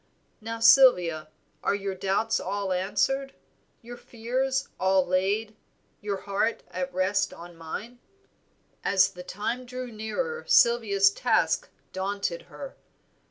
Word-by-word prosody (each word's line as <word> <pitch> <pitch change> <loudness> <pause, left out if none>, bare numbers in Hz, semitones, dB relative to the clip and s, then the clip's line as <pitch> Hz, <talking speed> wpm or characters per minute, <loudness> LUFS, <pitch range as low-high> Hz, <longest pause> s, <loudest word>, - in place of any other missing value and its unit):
Now 225 +1 -5
Sylvia, 205 - +5 0.3
are - - +1
your 200 -1 -3
doubts 195 +4 0
all 195 0 -2
answered, 270 +9 -1 0.5
your 240 +1 -9
fears 260 +4 -2
all 190 0 +3
laid, 200 +4 0 0.5
your 200 -2 -3
heart 205 +3 -1
at 180 0 -3
rest 190 +2 0
on 175 0 -11
mine?" 210 +9 -7 0.8
As 195 0 +3
the 180 -2 -10
time 210 +7 -4
drew 250 0 -7
nearer 470 - -4
Sylvia's 205 -4 +4
task 210 -8 +1 0.2
daunted 200 - -2
her. - - -9
205 Hz, 115 wpm, -27 LUFS, 190-240 Hz, 0.8 s, Sylvia